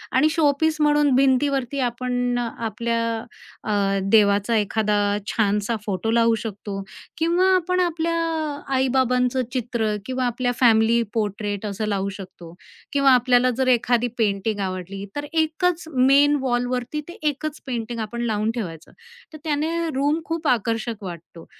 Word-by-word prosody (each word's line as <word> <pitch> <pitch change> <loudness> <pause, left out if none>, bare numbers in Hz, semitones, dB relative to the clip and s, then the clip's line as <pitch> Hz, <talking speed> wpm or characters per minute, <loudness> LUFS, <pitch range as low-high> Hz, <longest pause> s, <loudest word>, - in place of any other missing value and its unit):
आणि 290 +4 +4
शोपीस 310 0 +2
म्हणून 295 -1 +3
भिंतीवरती 270 0 +2
आपण 245 0 -2
अ, 240 - -1 0.2
आपल्या 230 +2 -1 0.6
अ, 200 -2 0
देवाचा 205 +1 +4
एखादा 210 0 +1 0.3
छानसा 210 +1 0
फोटो 205 +2 -1
लावू 230 -1 +3
शकतो 200 -2 -5 0.4
किंवा 340 +4 +2
आपण 365 0 0
आपल्या 335 -1 0 0.6
आई-बाबांचं 255 -1 +2
चित्र 230 -4 -1
किंवा 255 0 -2
आपल्या 245 +1 0
फॅमिली 230 -1 +4
पोर्ट्रेट 205 -1 -2
असं 210 +1 -3
लावू 200 -1 -1
शकतो 180 -4 -11 0.4
किंवा 275 -1 +4
आपल्याला 250 0 +4
जर 265 - +1
एखादी 245 0 +1
पेंटिंग 205 -1 0
आवडली, 190 +1 -4
तर 290 0 -3
एकच 330 +2 +1
मेन 280 +3 +5
वॉलवरती 250 +2 -1
ते 345 - -10
एकच 300 +1 -3
पेंटिंग 235 -2 -4
आपण 235 +2 -4
लावून 215 -1 0
ठेवायचं. 170 -9 -6 0.4
तर - - -8
त्याने 310 0 -1 0.2
रूम 290 +4 +1
खूप 330 -2 -3
आकर्षक 230 -2 +2 0.3
वाटतो 170 -2 -9
245 Hz, 135 wpm, -23 LUFS, 210-280 Hz, 0.6 s, मेन